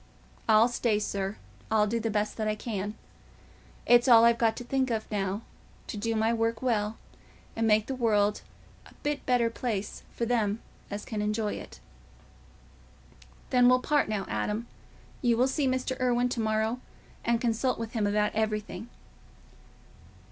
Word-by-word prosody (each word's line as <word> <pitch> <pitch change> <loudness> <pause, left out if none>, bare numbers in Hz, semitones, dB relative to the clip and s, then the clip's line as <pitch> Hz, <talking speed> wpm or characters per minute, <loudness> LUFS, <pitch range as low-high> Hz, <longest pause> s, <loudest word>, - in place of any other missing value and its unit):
I'll 220 +1 +7
stay, 235 -3 +1
sir, 200 -1 -2 0.3
I'll 215 -1 +3
do 230 +3 -1
the 225 0 -1
best 210 +1 -1
I 215 -1 0
can. 210 -2 -4 0.9
It's 240 +1 +5
all 230 -2 +8
I've 235 0 +4
got 225 -1 +3
to - - -5
think 260 +1 0
of 220 -2 -1
now—to 200 +2 -5
do 225 +2 -1
my 220 +1 +2
work 230 +1 -1
well 220 -3 0 0.6
and 225 0 +1
make 215 0 +4
the 270 - -3
world 210 -4 +2 0.5
a - - -18
bit 295 -1 -1
better 240 -2 +3
place 215 -4 -3
for 235 - -2
them 220 -3 +1 0.3
as 205 0 -5
can 215 -2 -3
enjoy 210 0 -1
it." - - -9 1.7
"Then 250 -1 +6
we'll 255 0 +5
part 295 -2 +1
now, 205 -3 -1
Adam. 210 - -2 0.6
You 235 -2 +3
will 250 +2 +4
see 270 +1 0
Mr. 260 0 -1
Irwine 245 0 +2
to 245 - -3
morrow, 220 +2 0 0.4
and 235 -1 +2
consult 240 +2 0
with 230 -1 -5
him 215 -4 0
about 210 +1 +1
everything." 220 +1 -2
225 Hz, 155 wpm, -28 LUFS, 210-240 Hz, 1.7 s, all